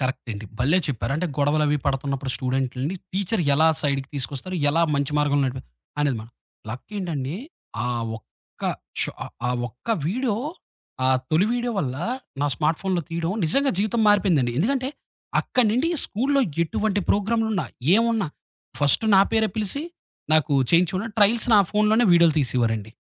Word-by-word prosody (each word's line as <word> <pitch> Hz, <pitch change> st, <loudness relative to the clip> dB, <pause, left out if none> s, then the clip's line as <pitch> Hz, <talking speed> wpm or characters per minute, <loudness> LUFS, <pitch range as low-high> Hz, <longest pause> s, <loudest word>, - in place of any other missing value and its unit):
Correct 130 Hz, -2 st, -3 dB
అండి. 105 Hz, +1 st, -7 dB
భల్లే 150 Hz, +9 st, +3 dB
చెప్పారు. 125 Hz, -2 st, -2 dB
అంటే, 180 Hz, +3 st, -1 dB
గొడవలవి 150 Hz, +1 st, +2 dB
పడుతున్నప్పుడు 135 Hz, -1 st, -1 dB
స్టూడెంట్లుని, 130 Hz, +5 st, -2 dB, 0.2 s
టీచరు 195 Hz, -2 st, 0 dB
ఎలా 160 Hz, +2 st, +5 dB
సైడుకి 140 Hz, -2 st, 0 dB
తీసుకొస్తారు? 140 Hz, +6 st, -4 dB
ఎలా 165 Hz, +3 st, +2 dB
మంచి 140 Hz, +1 st, -1 dB
మార్గంలో 145 Hz, -1 st, +2 dB
నడిపి 130 Hz, +1 st, -6 dB, 0.4 s
అనేది 145 Hz, -5 st, +1 dB
మాట. 115 Hz, -, -14 dB, 0.4 s
లక్కేంటండి, 160 Hz, -, -4 dB, 0.5 s
ఆ -, -, -1 dB, 0.3 s
ఒక్క -, -, -27 dB, 0.4 s
షో -, -, -1 dB
ఆ -, -, -6 dB, 0.2 s
ఆ -, -, +1 dB, 0.2 s
ఒక్క 125 Hz, -, -19 dB, 0.2 s
వీడియో 235 Hz, +3 st, 0 dB, 0.7 s
ఆ -, -, +3 dB, 0.2 s
తొలి 170 Hz, +6 st, +3 dB
వీడియో 245 Hz, -1 st, -1 dB
వల్ల 130 Hz, -6 st, -2 dB, 0.4 s
నా 145 Hz, -, +2 dB
స్మార్ట్ 155 Hz, +5 st, 0 dB
ఫోనులో 185 Hz, -3 st, -1 dB
తీయడం 170 Hz, +2 st, -2 dB
నిజంగా 275 Hz, -, +2 dB
జీవితం 215 Hz, +3 st, +1 dB
మారిపోయిందండి. 175 Hz, -, +3 dB
ఎందుకంటే, 260 Hz, -, 0 dB, 0.5 s
అక్కడి 250 Hz, -3 st, +2 dB
నుండి 255 Hz, +8 st, +1 dB, 0.2 s
స్కూల్లో 275 Hz, +6 st, +1 dB, 0.2 s
ఎటువంటి 205 Hz, +5 st, -1 dB
ప్రోగ్రాములున్నా 215 Hz, -3 st, +1 dB, 0.3 s
ఏమున్నా, 225 Hz, -5 st, +2 dB, 0.5 s
ఫస్ట్ 145 Hz, +9 st, +4 dB
నా 190 Hz, -, +7 dB
పేరే 220 Hz, -1 st, +3 dB
పిలిసి, 215 Hz, +8 st, -1 dB, 0.5 s
నాకు 155 Hz, -1 st, +3 dB, 0.2 s
చేయించుకుని 185 Hz, +5 st, +2 dB
ట్రయల్స్ 215 Hz, +3 st, +5 dB
నా -, -, +8 dB
ఫోనులోనే 215 Hz, +3 st, +3 dB
వీడియోలు 170 Hz, -2 st, +5 dB
తీసేవారండి. 115 Hz, -4 st, 0 dB
165 Hz, 145 wpm, -24 LUFS, 140-210 Hz, 0.7 s, నా